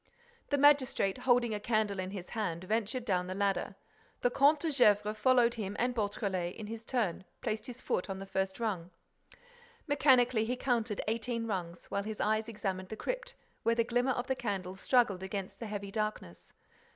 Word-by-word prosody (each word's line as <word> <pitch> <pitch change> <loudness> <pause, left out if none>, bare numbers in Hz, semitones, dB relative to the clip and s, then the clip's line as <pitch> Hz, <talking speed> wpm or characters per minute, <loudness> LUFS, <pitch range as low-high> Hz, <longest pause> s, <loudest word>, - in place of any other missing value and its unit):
The 285 - +2
magistrate, 270 -8 +4
holding 245 -2 +3
a 210 - -2
candle 215 -2 0
in 185 0 -2
his 190 -2 -7
hand, 185 -7 -2
ventured 225 +5 -1
down 180 -5 0
the 185 - -4
ladder. 200 -1 0 0.5
The 245 - +2
Comte 285 +3 +4
de 325 - 0
Gesvres 210 -5 +4
followed 240 +1 +4
him 205 -3 -4
and 245 +1 +1
Beautrelet, 200 -5 -2
in 220 - -7
his 225 +1 -6
turn, 225 -9 -1 0.2
placed 215 +1 -2
his 250 -1 -8
foot 180 - -1
on 190 - -3
the 195 - -6
first 190 +1 -2
rung. 190 -7 -2 1.0
Mechanically, 255 -5 +4
he 240 +3 -1
counted 235 -5 0
eighteen 230 +1 -1
rungs, 180 -5 -4
while 200 - 0
his 215 +1 -5
eyes 220 +1 +1
examined 190 -4 -3
the 220 - -4
crypt, - - -4 0.3
where 230 0 +2
the 230 - +3
glimmer 245 +3 +1
of 245 - -2
the 265 - 0
candle 195 -6 -3
struggled 205 -2 +2
against 195 0 -5
the 230 - -5
heavy 200 -1 -5
darkness. 215 - -4
215 Hz, 185 wpm, -32 LUFS, 195-245 Hz, 1.0 s, magistrate